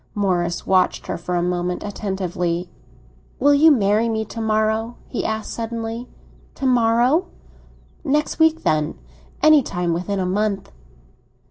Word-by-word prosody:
Morris 175 -4 0
watched 185 -1 +2
her - - -3
for 175 +1 -4
a 175 - +1
moment, 180 0 -2
attentively. 185 -4 -3 0.7
"Will 285 +2 +5
you 300 +3 +6
marry 220 -4 +3
me 220 -1 -1
to 225 +2 -7
morrow?" 220 +1 0
he - - -3
asked 220 0 -3
suddenly. 230 +1 -4 0.5
"To 275 - -4
morrow?" 245 +6 +3 0.8
"Next 300 +1 0
week, 320 0 +3
then. 150 - 0 0.5
Any 310 -1 +7
time 175 -7 -2
within 180 +4 -2
a 185 - 0
month." 200 +1 -1
215 Hz, 135 wpm, -21 LUFS, 180-240 Hz, 0.8 s, Any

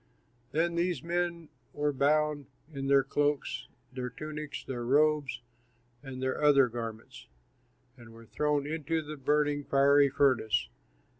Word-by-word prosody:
Then 170 +4 +1
these 170 0 -1
men 170 -1 -2 0.2
were 145 0 0
bound 145 +1 +1 0.3
in 135 -1 -4
their 140 -1 +5
cloaks, 140 -2 -1 0.3
their 125 -1 -4
tunics, 150 +1 -7
their 125 -3 -5
robes, 145 +1 +2 0.6
and 130 -2 -7
their 130 +2 -1
other 140 -3 +6
garments, 115 +1 -7 0.7
and 120 -2 -14
were 115 0 -14
thrown 150 +3 0
into 160 +1 -2
the 155 +1 -7
burning, 145 +1 +1
fiery 140 +1 +4
furnace. 125 - +2
145 Hz, 130 wpm, -30 LUFS, 130-150 Hz, 0.7 s, other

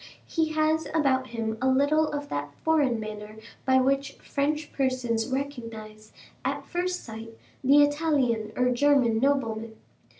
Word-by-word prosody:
He 320 -2 -1
has 310 +1 +1
about 265 -4 +2
him 225 -2 -3
a 260 - +2
little 285 +4 +3
of 290 -1 -4
that 145 0 -4
foreign 290 -7 +2
manner 215 0 -7 0.3
by 260 0 +4
which 275 +2 +1
French 300 +2 -2
persons 255 -4 0
recognize, 230 -6 -5 0.3
at - - -2
first 360 0 -2
sight, 225 0 -9 0.3
the 285 +3 +6
Italian 285 -8 +1
or 250 0 +2
German 250 -3 +3
nobleman. 230 -5 0
260 Hz, 135 wpm, -27 LUFS, 225-290 Hz, 0.3 s, the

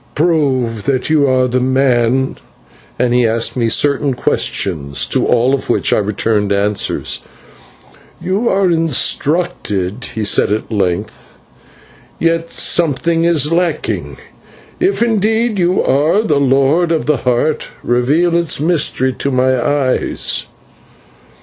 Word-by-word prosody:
"Prove 135 - 0
that 135 +1 -1
you 150 -3 +3
are 130 0 +2
the 125 +1 0
man" 130 -1 +1 0.6
and 125 -1 +1
he 125 -1 +3
asked 115 +1 -1
me 115 -3 0
certain, 140 +3 +2
secret - - -17
questions, 70 -7 0
to - - -1
all 125 +2 +2
of 140 - -3
which - - +1
I - - +2
returned 105 0 -1
answers. 100 +1 -1 1.0
"You 200 +6 -1
are 190 -2 +2
instructed," 150 - -1
he 110 - -2
said 100 - +2
at 110 +2 -3
length, 95 -5 -3 0.8
"yet 165 0 0
something 165 +1 +1
is 155 -3 +1
lacking; 170 -2 -2 0.6
if, 370 -8 +1
indeed, 220 0 0
you 180 +1 +1
are 155 +10 +2
the 180 -10 +1
Lord 140 +5 +2
of 160 -2 0
the 150 -1 +1
Heart, 125 +5 -1 0.2
reveal 145 +8 +1
its 170 -4 +1
mystery 145 -5 +1
to 140 - -3
my 130 0 +1
eyes." 140 -2 -1
140 Hz, 130 wpm, -15 LUFS, 120-165 Hz, 1.0 s, you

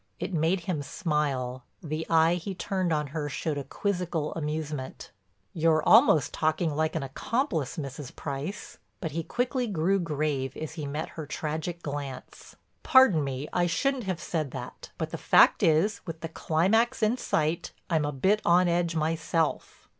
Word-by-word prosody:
It - - -4
made 165 +3 +1
him 165 -3 -2
smile, 140 -6 -2 0.2
the 155 0 -3
eye 165 +1 +5
he 180 +3 -4
turned 185 -1 -1
on 150 -1 +1
her 150 -2 -2
showed 145 +1 -2
a - - -4
quizzical 175 -4 -2
amusement: 150 -3 -4 0.4
"You're 160 -1 +2
almost 220 - +5
talking 155 0 0
like 155 +1 0
an 160 - -1
accomplice, 160 - -2
Mrs. 140 -2 -6
Price." 145 +8 -5 0.2
But 160 -4 -4
he 165 +3 -2
quickly 245 - -1
grew 195 0 +1
grave 150 -5 -2
as 155 - -5
he 155 -3 -5
met 150 +3 -4
her 155 -3 -7
tragic 160 +3 -4
glance. 140 -3 -7 0.3
"Pardon 260 - +6
me, 135 +1 -4
I 175 -1 +2
shouldn't 255 +8 0
have 185 -3 -2
said 155 -3 -2
that, - - -8
but - - -3
the - - -5
fact - - +5
is, 165 +7 +3
with 165 -1 -6
the 165 - -4
climax 220 +13 +1
in 215 +3 +3
sight, 160 -8 -1 0.2
I'm 160 -3 +1
a 145 - -1
bit 190 +10 +2
on 175 +1 +4
edge 170 -1 +1
myself." 160 0 -1
160 Hz, 165 wpm, -28 LUFS, 150-180 Hz, 0.4 s, Pardon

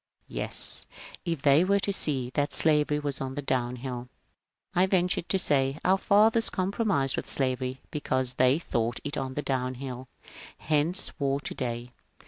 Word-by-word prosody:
" - - -55
" - - -43
Yes, - - +1 0.4
if 165 -5 -3
they 145 +3 +5
were 200 +2 +2
to 200 - 0
see 135 -9 0
that 145 0 0
slavery 150 -1 +3
was 145 -2 -3
on 135 0 -4
the 145 - -3
downhill." 125 -1 -3 0.6
I 180 +2 +3
ventured 180 -2 0
to 195 - +2
say, 135 -5 +2
" - - -20
Our 190 +1 +4
fathers 220 +4 +4
compromised 190 - +1
with - - -5
slavery 130 -1 -2
because 130 -4 -1
they 130 +2 +3
thought 120 -7 -2
it 145 - -4
on 130 -1 -4
the 145 - -2
downhill; 130 0 -3 0.5
hence 155 +3 0
war 140 -1 0
to - - -4
day." 120 -1 -4
140 Hz, 170 wpm, -28 LUFS, 130-170 Hz, 0.6 s, they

